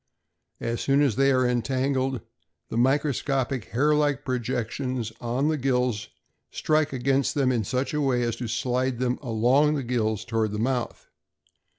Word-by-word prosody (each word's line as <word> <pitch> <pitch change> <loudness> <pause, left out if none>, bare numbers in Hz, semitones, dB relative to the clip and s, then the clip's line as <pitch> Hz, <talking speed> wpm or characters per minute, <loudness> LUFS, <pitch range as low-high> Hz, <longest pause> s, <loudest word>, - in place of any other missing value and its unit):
As 115 0 -2
soon 140 +1 +3
as 135 -7 +2
they 135 +2 +4
are 130 -1 +3
entangled, 130 +1 0 0.5
the - - -3
microscopic 135 -1 +1
hair 145 +6 +2
like 145 -1 +1
projections 125 -1 -2
on 125 +4 0
the 155 0 +1
gills 125 -5 0 0.4
strike 155 -1 +1
against 135 +1 0
them 135 -3 +2
in 120 -3 0
such 130 +8 -2
a 150 - 0
way 130 -3 +1
as 120 -1 -1
to 120 - -4
slide 125 +2 -1
them 125 0 -1
along 130 +5 +2
the 140 - -2
gills 110 -3 -1
toward 110 -3 -1
the - - -2
mouth. 120 +2 -2
130 Hz, 160 wpm, -26 LUFS, 120-135 Hz, 0.5 s, they